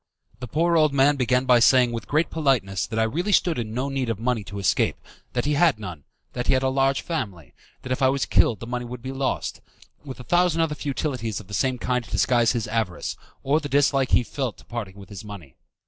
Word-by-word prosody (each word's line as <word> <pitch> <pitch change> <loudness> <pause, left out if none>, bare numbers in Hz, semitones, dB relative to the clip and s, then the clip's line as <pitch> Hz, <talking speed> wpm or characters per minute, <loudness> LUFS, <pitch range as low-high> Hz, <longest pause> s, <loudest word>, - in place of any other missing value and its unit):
The 125 - -6
poor 170 +7 +1
old 155 -3 +3
man 140 +2 +4
began 125 -1 +1
by 125 -2 +5
saying 125 0 +5
with 115 -2 -5
great 155 +3 +1
politeness 115 -11 0
that 110 - -5
I 110 - +3
really 170 - -1
stood 175 -6 +2
in 110 -2 -4
no 125 +4 -2
need 135 -3 -2
of 115 - -1
money 115 -1 -1
to 100 - -8
escape, 100 -2 +1 0.4
that 120 - -1
he 150 - +1
had 150 -3 +3
none, 90 -9 -8 0.3
that 125 -1 -4
he - - +4
had 130 0 +1
a 130 - +2
large 135 0 +1
family, 100 - -5 0.3
that 130 - -6
if 130 - -1
I 130 - +5
was 135 0 0
killed 110 - +2
the - - -5
money 125 +1 -3
would 120 0 -8
be 130 - -4
lost, 135 -1 -2 0.4
with 135 -3 -9
a - - -8
thousand 175 +1 +2
other 160 -2 0
futilities 135 -7 -3
of 105 - -12
the 100 - -12
same 130 +4 0
kind 125 0 -1
to - - -15
disguise 120 -2 +2
his 115 -3 -2
avarice, 110 -5 -2 0.3
or 145 +3 +2
the 145 -2 -6
dislike 140 -1 +2
he - - +4
felt 130 -2 -4
to - - -18
parting 110 -5 -6
with 100 -1 -13
his 100 -1 -9
money. 100 -11 -10
125 Hz, 240 wpm, -24 LUFS, 110-140 Hz, 0.4 s, by